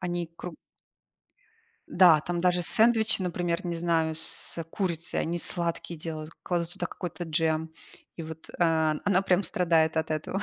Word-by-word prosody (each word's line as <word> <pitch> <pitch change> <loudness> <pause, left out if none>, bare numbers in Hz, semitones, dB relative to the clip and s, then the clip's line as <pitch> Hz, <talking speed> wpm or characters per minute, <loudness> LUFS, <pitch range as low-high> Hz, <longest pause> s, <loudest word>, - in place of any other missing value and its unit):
они 175 -2 -3
круг 175 -2 -7 1.4
Да, 175 -4 +6
там 175 +2 -3
даже 180 -1 +2
сэндвичи, 220 -1 +3
например, 175 0 -2
не 175 - -2
знаю, 165 -1 0
с, 160 - +3
э, 165 - -3
курицей, 170 -1 -2
они 170 +1 -2
сладкие 170 -1 -3
делают, 155 0 -6
кладут 175 0 -2
туда 185 - -4
какой-то 175 0 -6
джем, 160 0 -1 0.4
и 165 - -6
вот, 160 0 -9
а, 160 -2 +2
она 195 -2 +3
прям 190 0 +2
страдает 165 -4 +1
от 160 0 -1
этого. 160 +6 -3
170 Hz, 155 wpm, -27 LUFS, 160-180 Hz, 1.4 s, Да